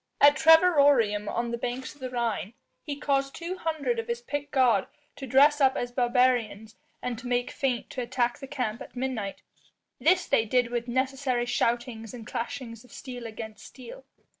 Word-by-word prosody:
At 290 0 +7
Trevirorum 285 - +5
on 235 0 -2
the 235 - -3
banks 250 +2 -4
of 290 - -23
the 255 - -4
Rhine, 235 -3 -2 0.3
he 290 - -5
caused 275 -1 -1
two 350 +2 -5
hundred 325 +8 -1
of 455 - -4
his 470 0 -2
picked 290 - -4
guard 240 -8 +3 0.3
to 270 - -7
dress 285 +4 +5
up 265 0 +4
as 245 0 -3
barbarians 240 -3 +1 0.3
and 245 -2 -3
to 250 - -8
make 245 0 0
feint 255 -3 -2
to 255 - -4
attack 240 0 -1
the 270 - -8
camp 250 -6 -3
at - - -11
midnight. 245 -6 -4 0.6
This 365 +2 +3
they 225 - +2
did 245 +1 +1
with 240 0 -2
necessary 260 0 0
shoutings 240 -1 -1
and 230 -3 -9
clashings 230 -1 -5
of 250 - -19
steel 245 -3 -8
against 220 -1 -8
steel. - - -11
250 Hz, 180 wpm, -27 LUFS, 235-280 Hz, 0.6 s, At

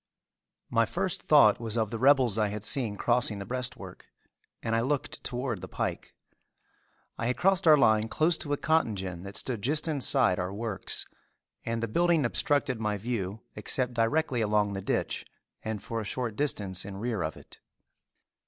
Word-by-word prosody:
My - - +3
first - - -2
thought - - +5
was 115 -1 -3
of 110 -2 0
the 115 - -4
rebels 130 -4 +4
I 105 - +2
had 105 0 -5
seen 115 -3 +2
crossing 120 -2 +2
the 100 - -6
breastwork, 125 +2 -5 0.6
and 115 0 0
I 115 - +2
looked 140 +3 -2
toward 120 -5 -3
the - - -7
pike. - - -4 1.0
I 115 - -1
had 125 - -1
crossed 190 -2 +2
our 155 -1 +8
line 110 -5 +3
close 160 +8 +2
to 145 - -5
a 145 - +1
cotton 160 -9 +1
gin 95 -3 -5
that 100 +1 -5
stood 120 -5 -3
just 150 +7 +2
inside 135 - +3
our 90 +1 -2
works 110 -1 -2 0.6
and 115 0 -2
the - - 0
building 170 +4 +2
obstructed 130 0 0
my 105 -2 -1
view 105 -2 -4
except 125 +4 0
directly 120 +2 +1
along 105 -1 +1
the 95 - -4
ditch - - -2 0.4
and 110 -2 -5
for 115 -1 -3
a - - -5
short 115 +1 -3
distance 100 -9 0
in 95 -1 -8
rear 110 -2 -2
of 80 -1 -3
it. - - -16
115 Hz, 180 wpm, -28 LUFS, 105-130 Hz, 1.0 s, our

